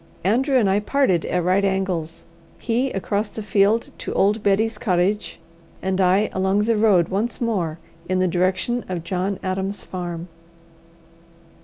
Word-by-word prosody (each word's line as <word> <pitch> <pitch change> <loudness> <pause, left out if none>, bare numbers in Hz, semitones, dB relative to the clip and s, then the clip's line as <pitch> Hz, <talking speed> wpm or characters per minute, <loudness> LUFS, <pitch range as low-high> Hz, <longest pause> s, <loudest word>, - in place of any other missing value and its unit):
Andrew 260 - +2
and 225 -5 +3
I 195 +1 +3
parted 210 - +1
at 180 -1 0
right 185 +3 +2
angles; 190 -4 -2 0.3
he 245 +3 0
across 200 +2 -2
the 220 - -7
field 205 +3 +2
to - - -5
old 205 +2 +2
Betty's 210 +2 +1
cottage, 190 +1 0 0.4
and 190 0 -1
I 190 +3 +3
along 190 +2 +1
the 230 +1 +2
road 205 -6 +3
once 210 +5 -2
more 185 -10 -1 0.3
in 185 - +1
the 185 0 +2
direction 185 +7 0
of 175 -3 -3
John 185 +3 -2
Adam's 190 +2 -2
farm. 175 -2 -5
195 Hz, 150 wpm, -22 LUFS, 185-215 Hz, 0.4 s, and